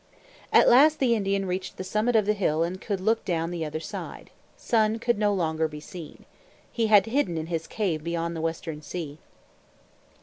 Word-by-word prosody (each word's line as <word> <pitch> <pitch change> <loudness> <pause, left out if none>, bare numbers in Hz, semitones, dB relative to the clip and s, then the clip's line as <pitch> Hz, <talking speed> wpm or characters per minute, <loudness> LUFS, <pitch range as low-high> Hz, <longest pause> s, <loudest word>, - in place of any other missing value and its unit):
At - - +6
last 300 +5 +6
the 255 -5 +2
Indian 195 -2 0
reached 185 0 -4
the - - -4
summit 215 +5 0
of 215 -2 +4
the 210 - +2
hill 165 -6 +1
and 180 +3 -4
could 200 -3 -2
look 220 +4 +1
down 165 -1 -1
the 170 -2 -3
other 155 0 -4
side. - - -8 0.3
Sun 220 -1 +1
could 235 -2 0
no 210 -1 +3
longer 160 -4 0
be 150 -1 -9
seen. 160 +1 -11 0.5
He 230 -2 0
had 205 -3 +6
hidden 225 - 0
in 155 - -3
his 165 -1 -3
cave 175 -8 -2
beyond 170 0 -2
the 160 - -4
Western 160 -1 -4
Sea. 155 -1 -6
185 Hz, 195 wpm, -26 LUFS, 165-215 Hz, 0.5 s, At